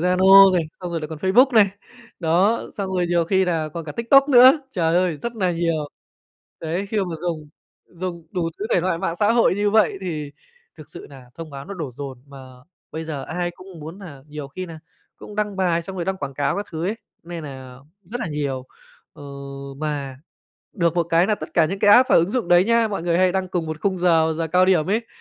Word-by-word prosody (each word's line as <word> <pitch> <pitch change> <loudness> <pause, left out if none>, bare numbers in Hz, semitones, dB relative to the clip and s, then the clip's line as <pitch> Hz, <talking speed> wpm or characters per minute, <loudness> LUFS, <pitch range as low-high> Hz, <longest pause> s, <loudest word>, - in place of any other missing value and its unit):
Zalo 190 +2 +7
này, 170 - +2 0.2
xong 180 -1 -5
rồi 165 - -3
lại 155 - -6
còn 160 -2 -7
Facebook 240 - +4
này, 205 -3 +6 0.5
đó, 180 +7 +2
xong 195 -2 -4
rồi 180 -1 +1
nhiều 170 -1 +2
khi 190 +2 +2
là 165 -3 -1
còn 165 +1 -7
cả 150 - -7
TikTok 275 +5 +4
nữa, 255 0 +8 0.2
trời 165 -5 0
ơi, 180 -3 +1
rất 235 +7 -6
nà 185 -4 +1
nhiều. 165 -3 -1 0.7
Đấy, 170 +5 -3
khi 220 - -4
mà 175 -4 -2
dùng 160 -3 -4 0.4
dùng 170 -2 -7
đủ 170 -2 -2
thứ 215 - -3
thể 175 - +3
loại 175 -2 -1
mạng 170 -2 -3
xã 210 +3 +2
hội 235 -5 +3
như 205 0 0
vậy 215 -2 +3
thì 155 -6 -5 0.5
thực 155 -1 -13
sự - - -11
nà 130 -3 -13
thông 165 -1 -9
báo 140 -1 -8
nó 200 - -8
đổ 155 -7 -5
dồn, 135 -1 -8
mà 140 -1 -13 0.5
bây 160 0 -5
giờ 145 -4 -5
ai 175 +1 -3
cũng 185 -1 -13
muốn 160 +6 -9
nà 150 -9 -11
nhiều 150 -2 -7
khi 185 +6 -7
nà 165 -1 -10 0.4
cũng 210 - -11
đăng 210 -2 -2
bài 175 -3 +1
xong 190 +2 -8
rồi 170 - -3
đăng 190 0 -2
quảng 140 -5 -6
cáo 145 +5 -1
các 205 - -4
thứ 160 +1 -4
ấy, 210 - -1 0.3
nên 170 -1 -7
nà 130 -2 -9 0.3
rất 240 +8 -7
là - - -2
nhiều. 140 -3 -3 0.5
Ờ, - - -14 0.5
mà 140 -3 -4 0.6
được 170 -4 0
một 170 - +2
cái 170 +2 +2
là 215 - +2
tất - - -10
cả 165 - +5
những 195 +4 -4
cái 205 0 +4
app 255 +2 +6
và - - +6
ứng 170 +4 +3
dụng 245 -8 -2
đấy 175 +1 +5
nhá, 230 0 +2
mọi 195 -5 -4
người 170 0 +1
hay 185 -1 +3
đăng 190 -1 -2
cùng 175 -3 -2
một 155 0 -5
khung 190 -2 -1
giờ, 165 -2 +3
giờ 165 0 -1
cao 180 +3 +4
điểm 185 -5 +2
ấy, 220 +5 -1
175 Hz, 240 wpm, -22 LUFS, 160-195 Hz, 0.7 s, nữa